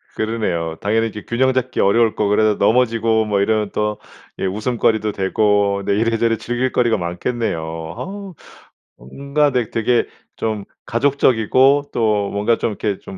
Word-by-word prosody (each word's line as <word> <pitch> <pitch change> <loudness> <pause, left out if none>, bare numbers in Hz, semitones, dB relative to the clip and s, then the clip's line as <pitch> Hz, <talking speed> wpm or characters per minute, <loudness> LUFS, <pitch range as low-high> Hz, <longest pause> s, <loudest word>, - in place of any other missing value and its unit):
그러네요. 90 -8 -2
당연히 110 +2 +1
이렇게 105 -2 -8
균형 130 +2 +1
잡기 130 0 -2
어려울 110 +3 +3
거고 105 -1 0
그래서 105 0 +3
넘어지고 115 0 +2
뭐 105 -2 0
이러면 105 0 0
또 105 0 -1 0.4
예 - - -1
웃음거리도 110 +1 0
되고 100 0 +1
네 100 - +1
이래저래 115 +1 +1
즐길 125 +1 -2
거리가 120 -2 +2
많겠네요. 85 -4 -3
아. 195 0 -7 0.6
뭔가 140 - -1
네 125 -4 0
되게 115 +1 +1 0.3
좀 110 -3 -3 0.2
가족적이고 130 +1 +3
또 105 -3 +1
뭔가 105 +3 +1
좀 - - -1
이렇게 105 -1 -2
좀 95 - -10
110 Hz, 330 characters per minute, -19 LUFS, 100-120 Hz, 0.6 s, 어려울